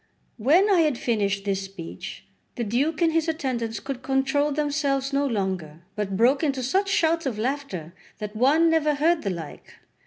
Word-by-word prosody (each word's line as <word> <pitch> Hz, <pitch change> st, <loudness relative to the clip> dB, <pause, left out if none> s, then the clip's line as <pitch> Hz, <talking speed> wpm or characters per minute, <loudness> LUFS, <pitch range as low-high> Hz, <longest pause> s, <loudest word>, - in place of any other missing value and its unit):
When 305 Hz, -, +4 dB
I 390 Hz, -4 st, +4 dB
had 305 Hz, -6 st, +2 dB
finished 200 Hz, -4 st, -1 dB
this 195 Hz, -1 st, 0 dB
speech, 195 Hz, -4 st, -8 dB, 0.3 s
the 240 Hz, -, -2 dB
Duke 280 Hz, -, 0 dB
and 325 Hz, -1 st, +3 dB
his 330 Hz, 0 st, +1 dB
attendants 255 Hz, -8 st, -2 dB
could 270 Hz, -3 st, -6 dB
control 270 Hz, +2 st, +1 dB
themselves 285 Hz, -2 st, 0 dB
no 280 Hz, +1 st, +2 dB
longer, 190 Hz, -, -3 dB
but 200 Hz, -3 st, -2 dB
broke 255 Hz, +5 st, +4 dB
into 270 Hz, -4 st, 0 dB
such 385 Hz, +10 st, +1 dB
shouts 330 Hz, -4 st, +2 dB
of 235 Hz, -5 st, -3 dB
laughter 220 Hz, -, -3 dB, 0.2 s
that 210 Hz, 0 st, -6 dB
one 285 Hz, +8 st, +4 dB
never 310 Hz, -2 st, +2 dB
heard 320 Hz, +3 st, +2 dB
the 200 Hz, -, -2 dB
like. 170 Hz, -5 st, -7 dB
270 Hz, 175 wpm, -25 LUFS, 210-300 Hz, 0.3 s, When